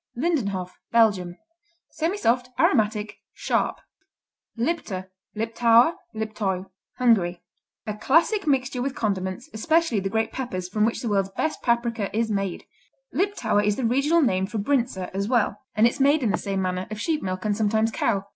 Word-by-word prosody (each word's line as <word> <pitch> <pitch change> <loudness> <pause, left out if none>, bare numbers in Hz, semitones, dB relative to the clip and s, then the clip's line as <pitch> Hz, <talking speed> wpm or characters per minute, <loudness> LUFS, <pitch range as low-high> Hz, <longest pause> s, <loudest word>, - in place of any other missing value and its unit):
Lindenhof 205 - -1 0.2
Belgium 200 -6 +3 0.6
Semisoft; 255 - +1
aromatic; 210 -1 +1
sharp. - - -1 0.8
Lipta, 230 - -2 0.3
Liptauer, 230 +5 +4 0.2
Liptoiu 205 -4 -3 0.3
Hungary 180 -8 +2 0.4
A 215 - -3
classic 330 - +2
mixture 265 -2 +1
with 270 +1 -2
condiments, 195 +3 -2
especially 315 +1 +2
the 195 0 -2
great 220 +2 0
peppers 185 -9 -4
from 210 +3 +1
which 230 - -1
the - - -2
world's 195 -2 +1
best 315 - -1
paprika 235 -4 0
is 225 -1 +1
made. 195 -3 -2 0.5
Liptauer 390 - +1
is 210 0 +2
the 255 - -2
regional 285 +8 +3
name 190 -6 +1
for 220 - -5
Brinza, 215 -5 -1
as 200 +1 -1
well, 225 -4 +1
and 215 - +5
it's 240 +4 +1
made 285 +1 +4
in 220 - +2
the - - +1
same 195 -1 -2
manner, 185 0 -2
of 215 -1 -6
sheep 315 +3 0
milk 185 +1 -4
and 210 -1 +1
sometimes 220 +1 +1
cow. 200 -2 0
220 Hz, 155 wpm, -25 LUFS, 195-255 Hz, 0.8 s, and